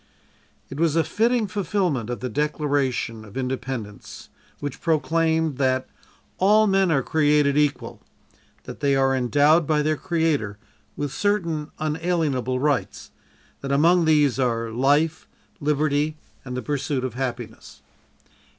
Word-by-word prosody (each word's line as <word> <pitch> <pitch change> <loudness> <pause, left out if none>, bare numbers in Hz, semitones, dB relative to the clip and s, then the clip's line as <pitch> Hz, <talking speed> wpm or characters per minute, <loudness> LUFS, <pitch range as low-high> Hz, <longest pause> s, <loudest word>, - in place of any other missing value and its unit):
It 135 - -6
was 165 -2 +2
a 165 - +3
fitting 225 +8 +1
fulfillment 185 - -1
of 120 -4 -4
the 130 - -2 0.2
Declaration 140 -7 -1
of 105 +3 -11
Independence, 125 -5 -5 0.3
which 145 0 -6
proclaimed 160 -2 +1
that: 130 -1 +1 0.5
"All 210 +3 +5
men 195 -2 +2
are 140 -5 +2
created 150 -2 +2
equal; 145 -1 -1 0.6
that - - -9
they 140 -1 +2
are 135 0 +2
endowed 145 +5 +3
by 150 -1 +2
their 155 0 0
Creator 160 - -1 0.4
with 145 -2 -3
certain 170 -7 -1
unalienable 155 -5 -1
rights; 145 -2 -1 0.5
that 140 - -5
among 165 +5 +4
these 150 -4 +3
are 115 -3 0
life, 145 +6 +1 0.3
liberty 150 +1 0 0.3
and 125 -1 -6
the 125 - -4
pursuit 140 0 -2
of 130 -3 -3
happiness." 125 -2 -6
145 Hz, 130 wpm, -23 LUFS, 130-160 Hz, 0.6 s, All